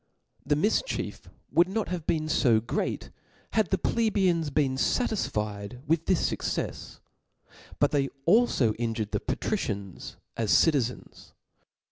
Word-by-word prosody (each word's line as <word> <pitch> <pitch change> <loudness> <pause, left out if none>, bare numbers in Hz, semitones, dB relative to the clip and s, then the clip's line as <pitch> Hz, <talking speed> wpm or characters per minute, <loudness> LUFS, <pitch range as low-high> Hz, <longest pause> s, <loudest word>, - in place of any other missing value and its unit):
The 145 - +1
mifchief 210 - -1 0.2
would 175 +2 +4
not 215 +2 -2
have 175 -3 -4
been 155 -1 +1
fo 120 -7 +3
great, 115 - -3 0.4
had 220 -3 +2
(he 190 - +2
plebeians 190 -6 +1
been 140 -2 +1
fatisfied 105 - -1
with 165 +1 +1
this 185 - +2
fuccefs; - - -4 0.8
but - - +3
|hey 140 -2 +2 0.2
alfo 175 - +4
injured 115 -3 -2
the - - 0
patricians 105 - -3 0.2
as 115 -2 -2
citizens. 135 -7 +1
150 Hz, 120 wpm, -27 LUFS, 115-190 Hz, 0.8 s, would